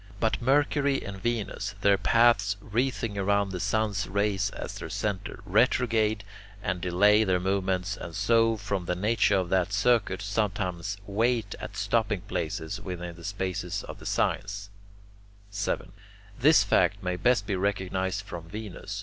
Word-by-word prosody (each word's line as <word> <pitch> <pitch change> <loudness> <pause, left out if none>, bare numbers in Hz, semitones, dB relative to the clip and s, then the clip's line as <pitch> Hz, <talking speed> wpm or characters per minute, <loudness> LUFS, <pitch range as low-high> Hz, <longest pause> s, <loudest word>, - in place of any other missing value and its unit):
But 110 +3 0
Mercury 140 +1 +2
and 100 -1 -6
Venus, 105 -3 -2
their 100 0 +5
paths 100 -1 +3
wreathing 115 -1 -1
around 100 0 +1
the 90 - -4
sun's 105 -1 0
rays 100 +1 0
as - - -6
their - - -6
centre, 100 -3 -3
retrograde 110 -4 +2 0.4
and 90 -1 -2
delay 105 +5 +4
their 95 -3 +2
movements, 95 +1 -1
and 80 - -8
so, 115 +2 +3
from 100 -3 -3
the 90 - -1
nature 105 +2 +2
of 95 -2 0
that 95 +1 +1
circuit, 105 -2 +2
sometimes 100 -2 -2
wait 110 +1 0
at - - -7
stopping 105 -2 0
places 80 -4 -4
within 90 -2 -6
the 85 - -13
spaces 95 -1 -3
of - - -9
the - - -8
signs. 100 0 -1 0.8
7. 100 -2 -2 0.5
This 145 -3 +6
fact 100 0 +2
may 90 0 -1
best 100 +3 +2
be 100 - -1
recognized 95 0 -1
from 85 -4 -8
Venus. 105 0 -6
100 Hz, 150 wpm, -28 LUFS, 95-110 Hz, 0.8 s, This